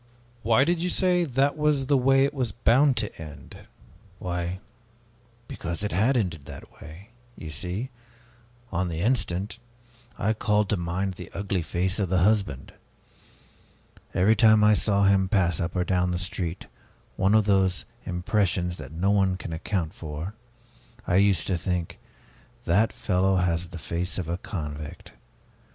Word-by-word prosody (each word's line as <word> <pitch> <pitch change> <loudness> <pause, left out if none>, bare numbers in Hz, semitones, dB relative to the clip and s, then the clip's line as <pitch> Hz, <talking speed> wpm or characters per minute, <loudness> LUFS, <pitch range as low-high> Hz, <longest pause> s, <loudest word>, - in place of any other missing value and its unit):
'" 120 - -32
"Why 115 +4 +4
did 170 +3 +1
you 180 - 0
say, 180 -1 +2
'That 140 0 +1
was 150 -3 +1
the 140 +1 +3
way 135 +1 +4
it 140 - -2
was 125 -6 -1
bound 125 +5 +3
to - - -3
end'?" 75 -2 -11 0.5
"Why 90 -1 -3 0.9
because 85 +4 -5
it 105 - -2
had 115 +9 +2
ended 85 -10 -2
that 70 -1 -12
way! 85 +7 -12 0.3
You 80 - -7
see 90 - -4 0.8
on 90 0 0
the 85 -1 -3
instant, 105 -2 -1 0.6
I 110 +2 +1
called 105 -1 +1
to - - +2
mind 90 +3 -2
the 90 -1 -9
ugly 100 -2 -1
face 90 +4 -1
of 95 -4 0
the 95 - +2
husband. 95 -7 +1 1.4
Every 105 +5 +4
time 110 0 +5
I 105 0 +6
saw 100 -1 +2
him 95 -1 +3
pass 90 -6 +2
up 85 +2 -3
or 90 - +2
down 90 0 +1
the 90 - -1
street 90 -1 -4 0.5
one 95 +3 +3
of 110 -2 +4
those 95 -3 +2 0.2
impressions 90 -1 -1
that - - -9
no 90 +5 0
one 95 -2 +2
can 85 - -6
account 80 0 -2
for 80 +5 -6 0.7
I 90 - +2
used 100 -4 +3
to 90 -3 -1
think, 90 -2 -3 0.7
'That 100 +6 +3
fellow 95 0 +1
has 90 -1 0
the 85 0 -9
face 85 +2 -4
of 90 -4 -3
a 85 +2 -3
convict!' 75 -6 -7
95 Hz, 160 wpm, -26 LUFS, 85-110 Hz, 1.4 s, I